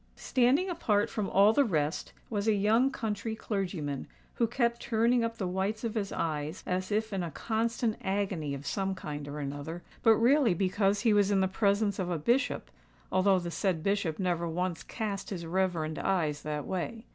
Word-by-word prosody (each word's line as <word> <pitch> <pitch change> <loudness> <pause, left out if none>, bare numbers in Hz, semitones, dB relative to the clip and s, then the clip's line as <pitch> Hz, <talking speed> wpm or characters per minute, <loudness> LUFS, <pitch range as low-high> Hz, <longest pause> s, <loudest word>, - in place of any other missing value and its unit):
Standing 265 +8 +2
apart 230 - +1
from 210 -3 -2
all 200 +3 +5
the 285 - +5
rest, 155 - -1 0.2
was 210 -1 -2
a 220 - +4
young 220 +6 +3
country 220 -3 -3
clergyman, 180 - -3 0.3
who 235 - +1
kept 235 0 0
turning 235 +1 +2
up 230 0 -2
the 190 - -2
whites 190 +5 -2
of 230 -2 -2
his 205 -3 -2
eyes 155 0 -3
as 185 +2 -2
if 215 0 0
in 195 - -1
a 170 - -3
constant 225 - -1
agony 190 -7 -1
of 140 +1 -9
some 195 +5 -1
kind 150 -5 -6
or 145 +1 -6
another—but 150 - 0
really 240 -2 +4
because 195 +2 +1
he 225 -2 +4
was 205 -1 +4
in 200 -2 +3
the 190 - +3
presence 200 +1 +1
of 180 -1 -1
a 175 - 0
Bishop, 240 - 0 0.4
although 190 +1 +4
the 175 -1 -3
said 180 -4 -1
Bishop 200 -6 0
never 175 -2 0
once 180 0 -2
cast 205 -4 -4
his 175 -4 -5
reverend 165 -3 -1
eyes 155 -7 0
that 150 -1 -3
way. 220 +5 -4
195 Hz, 185 wpm, -30 LUFS, 170-220 Hz, 0.4 s, all